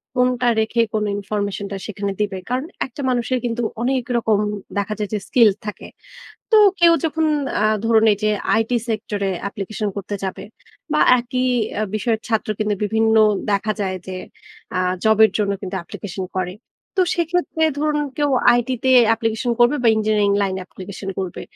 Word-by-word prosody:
কোনটা 250 -1 +2
রেখে 220 +2 +1
কোন 215 -1 0
information 205 0 -3
টা 200 - -3
সেখানে 200 -1 -3
দিবে? 200 -2 -1
কারণ 255 +3 -1 0.2
একটা 265 +2 -9
মানুষের 250 +1 0
কিন্তু 240 0 -2 0.2
অনেক 255 +1 0
রকম 220 -3 +2 0.4
দেখা 205 +1 -1
যায় 210 - -2
যে 210 - 0
স্কিল 230 -4 +5 0.2
থাকে। 210 - -6 0.7
তো - - +7 0.2
কেউ 340 -1 +7
যখন 320 0 +1 0.4
আ - - +2 0.2
ধরুন 225 -1 +4
এই - - 0
যে 215 - +2 0.3
IT 225 - -3 0.2
sector 215 -2 -3
এ - - 0 0.2
application 205 +2 -4
করতে 200 +1 -4
যাবে, 190 - -5 0.5
বা 300 - +2 0.2
একই 250 +1 -2 0.4
আ - - +1
বিষয়ের 220 +1 0
ছাত্র 220 -2 0
কিন্তু 210 -1 0
বিভিন্ন 220 +1 +2 0.4
দেখা 215 +2 0
যায় 190 -2 -1
যে 185 -1 -5 0.6
আ - - +2 0.2
জব 220 -1 +4
এর 220 - +4
জন্য 205 -1 +1
কিন্তু 190 -1 -5
application 190 +1 -6
করে। 180 0 -2 0.4
তো 375 - +5
সেক্ষেত্রে 340 -1 0
ধরুন 300 0 +1 0.2
কেউ 290 -1 +1 0.3
IT 240 - -3 0.2
তে 260 - +3 0.2
application 225 +2 -1
করবে 240 +5 +5
বা 235 - +4
ইঞ্জিনিয়ারিং 215 -1 +2
লাইনে 190 -1 -1
application 195 +1 -9
করবে। 185 -2 -4
220 Hz, 170 wpm, -20 LUFS, 200-245 Hz, 0.7 s, তো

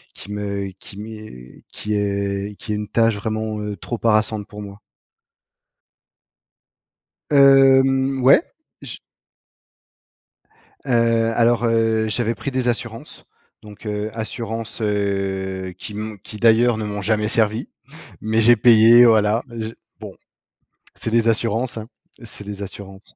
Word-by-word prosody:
qui 100 - -10
me 100 -1 -4
qui 100 - -12
m'est 105 - -11
qui 105 - -5
est 100 0 -2
qui 105 - -5
est - - -1
une 105 0 -4
tâche 115 0 +2
vraiment, 110 0 -3
heu, 105 -1 -5
trop 120 +6 -6
harassante 110 -1 +1
pour 105 0 -9
moi. 100 0 -11 2.5
Hem, 135 -1 +5
ouais, 130 - +7 0.4
j - - -8 1.9
Heu, 115 -3 +2
alors, 120 0 +2
heu, 115 -1 +1
j'avais 115 +1 -1
pris 115 - -5
des 130 -2 -1
assurances. 115 -1 -5 0.4
Donc, 105 +1 -13
heu, 105 +1 -3
assurances, 115 0 -5
heu, 95 -2 -2
qui 105 - -8
m 105 0 -6
qui 105 - -10
d'ailleurs 115 +1 +4
ne 110 - -4
m'ont 105 -1 -4
jamais 105 0 0
servies. 110 +1 0 0.5
Mais, 110 +1 0
j'ai 120 +2 +5
payé, 115 +1 +7
voilà, 110 0 +3
je 110 -2 -5 0.3
bon. - - -8 0.8
C'est - - -5
les 115 0 +2
assurances, 115 +2 -1
hein, 110 - -7 0.4
c'est 105 -2 -10
les 100 0 -7
assurances. 95 0 -10
110 Hz, 130 wpm, -20 LUFS, 105-115 Hz, 2.5 s, ouais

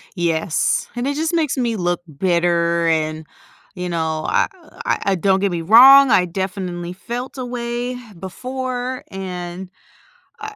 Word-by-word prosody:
Yes, 165 -2 0
and 245 +2 -2
it 285 - -1
just 320 +3 -1
makes 310 -5 0
me 235 -2 0
look 175 -1 -1 0.2
bitter 170 -1 +1
and, 155 -1 0 0.5
you 180 -1 -4
know, 160 -2 -2
I, - - +2 0.2
uh, - - -19
I - - +1
I - - +2
don't 190 +1 +2
get 200 -1 0
me 170 -1 -2
wrong, 260 +8 +8
I 180 - +4
definitely 180 -1 -4
felt 240 +8 -6
a 255 - -4
way 240 0 -4 0.2
before 255 +5 -5
and, 180 -1 -6 0.7
uh, 435 - -6
190 Hz, 155 wpm, -20 LUFS, 175-250 Hz, 0.7 s, wrong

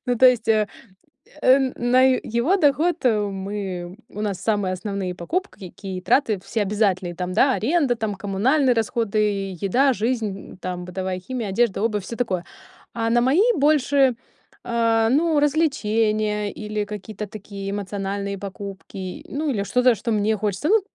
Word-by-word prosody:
Ну, 245 - +1
то 255 - +8
есть, 235 -3 0
э 215 -2 +3 0.7
э, 260 +1 +6 0.2
на 245 +2 +3 0.4
его 330 +12 +3
доход 320 0 +2
мы 195 -4 -2
у 210 - -8
нас 200 -3 -2
самые 205 -4 0
основные 190 -1 -4
покупки, 195 - -4
какие 190 -2 -7
траты 220 +1 +2
все 220 - -1
обязательные. 195 -3 0
Там, 180 +1 -3
да, 265 +7 +4
аренда, 275 -1 +1
там, 220 -2 -2
коммунальные 240 +8 +2
расходы, 225 -1 -1 0.4
еда, 260 +8 +3
жизнь, 220 -4 -3
там, 180 -1 -4
бытовая 185 0 -3
химия, 230 +2 -4
одежда, 205 0 +1
обувь, 210 -4 0
всё 230 - -6
такое. 190 -8 -1 0.5
А 225 -1 -1
на 240 +1 +4
мои 275 - +4
больше, 280 -2 +3 0.5
а, 230 -1 +2
ну, 305 +2 +3
развлечения 215 -8 +1
или 210 -1 -3
какие-то 210 0 -7
такие 200 -1 -7
эмоциональные 200 0 -3
покупки, 195 -1 -7
ну, 300 +2 -2
или 205 -6 -1
что-то, 250 +3 +3
что 230 +1 -2
мне 215 +1 +1
хочется, 210 - -2
ну 440 +2 +5
215 Hz, 150 wpm, -23 LUFS, 195-250 Hz, 0.7 s, то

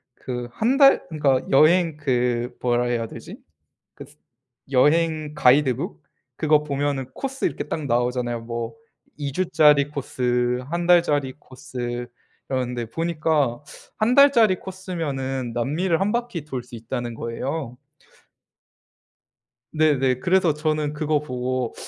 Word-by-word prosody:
그 125 -1 -5
1 235 - +1
달 275 -1 +6
그니까 140 -5 +1
여행 160 +3 +4
그 125 -4 -1
뭐라 120 0 +1
해야 120 -2 -1
되지? - - -10 0.6
그스 - - -13 0.5
여행 155 +2 +2
가이드북? 130 - +2 0.4
그거 150 -1 +3
보면은 140 -2 -2
코스 270 0 -4
이렇게 - - -2
딱 155 - -4
나오잖아요. 120 -1 -1
뭐 115 - -5 0.5
2 140 -2 -3
주짜리 150 -4 +4
코스, 125 -3 -1
1 170 0 -2
달짜리 145 -7 +3
코스 120 -2 -6 0.4
이러는데 125 -2 -2
보니까 155 -4 0 0.4
1 230 +3 +2
달짜리 240 -8 +6
코스면은 145 -10 -4
남미를 160 +9 0
1 195 +2 0
바퀴 235 -10 -3
돌 130 -5 -5
수 120 - -12
있다는 120 +1 -5
거예요. 125 +3 -4 1.9
네네. 135 -5 +2
그래서 180 -3 +2
저는 155 -1 -1
그거 150 -1 0
보고 125 -3 -3
140 Hz, 240 characters per minute, -23 LUFS, 125-160 Hz, 1.9 s, 달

